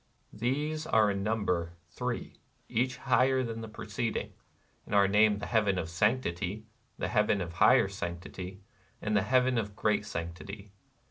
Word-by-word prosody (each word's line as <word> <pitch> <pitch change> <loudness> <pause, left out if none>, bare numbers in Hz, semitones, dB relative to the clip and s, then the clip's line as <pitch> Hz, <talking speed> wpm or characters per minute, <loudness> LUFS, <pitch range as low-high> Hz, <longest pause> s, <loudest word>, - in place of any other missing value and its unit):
These 150 +7 -1
are 110 -2 +4
in 100 0 -2
number 95 -5 0 0.2
three, - - -4
— - - -39
each 125 +3 0
higher 130 0 +3
than 115 -2 -4
the 110 - -6
preceding, 110 +2 -3 0.3
— - - -38
and 105 - -2
are 100 -1 +6
named 105 +1 +4
The - - -3
Heaven 105 -4 +2
of 85 -2 -3
Sanctity, 105 0 0 0.3
The - - -2
Heaven 105 -2 +2
of 85 -2 -4
Higher - - +5
Sanctity, 90 +2 -6 0.4
and 105 0 -1
The 100 - +4
Heaven 125 +3 +3
of 105 -2 -4
Great 105 -1 +1
Sanctity. 100 +4 -6
105 Hz, 160 wpm, -30 LUFS, 95-115 Hz, 0.4 s, are